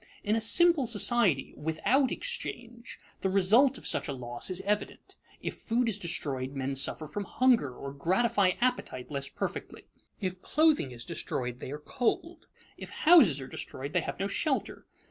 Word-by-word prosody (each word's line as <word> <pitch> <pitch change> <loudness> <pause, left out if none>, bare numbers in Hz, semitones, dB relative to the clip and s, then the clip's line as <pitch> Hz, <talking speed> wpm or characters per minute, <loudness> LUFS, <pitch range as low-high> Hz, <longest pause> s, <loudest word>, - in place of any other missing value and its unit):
In 210 +2 +1
a 225 - 0
simple 330 +3 +4
society, 220 - +3
without 240 - +1
exchange, 240 - -5 0.2
the 190 - 0
result 220 +8 +4
of - - -13
such - - 0
a 140 - -3
loss 120 +1 -3
is 185 0 -1
evident. 205 +2 -3 0.3
If - - -4
food 235 +1 0
is 210 -3 -1
destroyed, 140 -7 -3
men 135 0 -3
suffer 140 +3 +1
from 200 +7 -5
hunger 245 - +2
or 140 +1 -7
gratify 190 +6 +2
appetite 245 - -1
less 140 -1 -3
perfectly; - - -6 0.3
if 185 -1 -4
clothing 310 - +2
is 120 -1 -8
destroyed, 125 -1 -4
they - - -7
are 145 - -5
cold; 255 - -3 0.3
if - - -8
houses 295 - +5
are 130 - -7
destroyed, 140 +2 -6
they - - +2
have - - -6
no 195 - 0
shelter. 270 +7 -2
195 Hz, 165 wpm, -29 LUFS, -, 0.3 s, houses